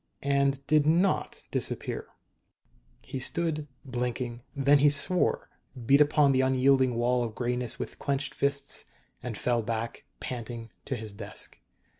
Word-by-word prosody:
And 140 -1 +1
did 150 0 +3
not 175 +5 +2
disappear. - - -2 1.0
He 130 0 -5
stood, 155 +2 -1 0.2
blinking. 125 -1 -3
Then 140 +1 +5
he 145 +1 +6
swore, 150 +5 +1 0.3
beat 140 +5 +6
upon 150 -1 +5
the 130 -1 +3
unyielding 130 -1 +3
wall 120 +1 +2
of 115 -2 -5
grayness 125 -1 -1
with - - -6
clenched 140 0 -2
fists, 140 0 -1 0.4
and 115 -4 -5
fell 120 +1 +1
back, 115 +1 -4
panting, 115 -2 -6
to 130 - -2
his 110 -2 -4
desk. 100 0 -7
130 Hz, 135 wpm, -28 LUFS, 120-140 Hz, 1.0 s, he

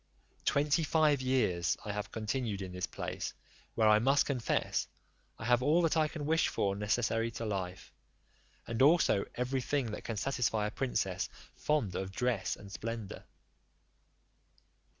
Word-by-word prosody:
Twenty 145 +3 +3
five 150 -2 +3
years 105 -10 +1
I 105 - -2
have 105 0 -4
continued 110 -2 -2
in 95 - -6
this 90 0 -3
place, - - -5 0.4
where, 110 -1 +4
I 105 0 +6
must 135 +5 +3
confess, 130 -5 0 0.5
I - - -7
have 120 +1 +4
all 155 +6 +3
that 165 - +2
I 155 -1 +3
can 150 -1 -6
wish 160 +2 +3
for 100 -1 0
necessary 115 +2 0
to 115 0 -5
life, 95 -3 -4 0.7
and 115 +2 -2
also 145 - +5
every 125 +2 -1
thing 130 -3 -1
that - - -6
can 115 - -4
satisfy 115 -3 0
a 105 - -2
princess 130 +3 -1 0.3
fond 145 -11 0
of 95 +1 -3
dress 120 +1 0
and 100 -1 -12
splendour. 115 -1 -5
115 Hz, 150 wpm, -32 LUFS, 105-140 Hz, 0.7 s, I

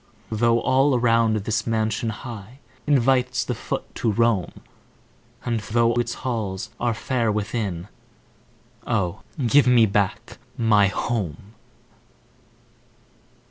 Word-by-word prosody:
Though 115 +1 +2
all 135 +1 +3
around 115 -2 +3
this 110 +1 -2
mansion 110 0 0
high 110 +1 -8 0.3
Invites 130 -2 +2
the - - -2
foot - - -5
to 115 - 0
roam, 110 -4 +1 0.9
And 120 -2 0
though 115 +2 +1
its 120 0 -1
halls 105 -7 -3
are 120 -2 0
fair 115 -1 0
within 105 -4 -3 1.0
Oh, 90 0 -1 0.2
give 135 +4 +5
me 120 -2 +6
back 100 -2 -1 0.2
my 105 -3 +4
HOME! 100 - -3
115 Hz, 105 wpm, -23 LUFS, 105-120 Hz, 1.0 s, me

